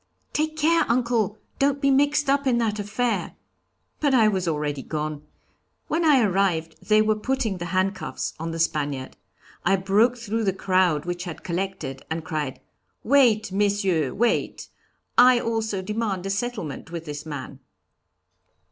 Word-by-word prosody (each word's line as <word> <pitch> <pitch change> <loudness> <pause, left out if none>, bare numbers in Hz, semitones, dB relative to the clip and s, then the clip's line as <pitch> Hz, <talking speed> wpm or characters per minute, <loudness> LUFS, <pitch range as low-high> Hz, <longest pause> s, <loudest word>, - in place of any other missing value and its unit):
'Take 310 +1 -1
care, 330 +2 +3
uncle, 235 -3 +1 0.2
don't 280 0 +2
be 275 -1 +3
mixed 290 +2 +3
up 280 0 +2
in 245 -2 +3
that 220 -3 0
affair.' 215 +4 -1 0.6
But 285 -3 +2
I 225 -3 +5
was 190 -3 -1
already 150 -3 -1
gone. 150 0 -4 0.7
When 335 - +1
I 295 -5 +5
arrived 180 -5 +1
they 215 0 +4
were 215 0 +3
putting 225 -3 -1
the 175 - -4
handcuffs 185 +2 -2
on 165 +1 -3
the 165 - -4
Spaniard. 145 -5 -1 0.5
I 195 - +3
broke 205 +6 +2
through 225 -1 -2
the 195 - +2
crowd 185 -5 +1
which 175 +1 -4
had 175 -3 -7
collected, 170 -6 -4
and 160 0 -3
cried, 150 -4 -3 0.4
'Wait, 230 -6 +4
Messieurs, 195 -8 +1
wait; 235 +3 0 0.5
I 250 -1 +7
also 220 -4 -2
demand 210 -2 -2
a 195 - -1
settlement 200 - -4
with 170 -1 -6
this 145 -1 -6
man.' 140 -3 -7
200 Hz, 150 wpm, -24 LUFS, 165-240 Hz, 0.7 s, I